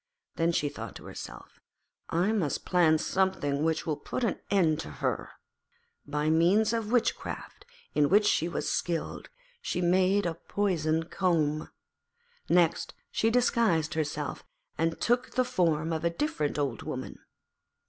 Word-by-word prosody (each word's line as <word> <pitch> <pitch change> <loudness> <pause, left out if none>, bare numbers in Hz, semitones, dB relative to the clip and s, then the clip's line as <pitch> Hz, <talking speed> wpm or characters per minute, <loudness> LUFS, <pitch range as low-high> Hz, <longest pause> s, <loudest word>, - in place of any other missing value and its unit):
Then 165 +1 +2
she 150 -3 +1
thought - - -7
to - - -10
herself, - - -9 0.5
'I 180 +6 +2
must 185 -10 -1
plan 170 -4 +4
something 155 -5 0
which 160 0 0
will 155 -3 0
put 255 - -4
an 225 - 0
end 165 -6 +3
to - - -5
her.' 75 - -2 0.8
By 150 +2 0
means 195 +7 +4
of 225 -2 -2
witchcraft, 245 - -1 0.3
in 145 -1 +3
which 205 +2 +5
she 170 -5 +2
was - - -3
skilled, 170 -2 -2 0.3
she 180 - -2
made 185 +3 +3
a 170 - 0
poisoned 165 -3 -1
comb. 155 -5 +1 0.8
Next 170 -1 +2 0.2
she 225 - +2
disguised 225 -9 +2
herself 150 -2 -3 0.3
and 165 0 -1
took 245 +2 0
the 255 - +3
form 165 -6 +1
of 160 - -2
a 170 - +3
different 170 - -1
Old 140 -6 -1
Woman. - - -6
170 Hz, 145 wpm, -29 LUFS, 155-200 Hz, 0.8 s, which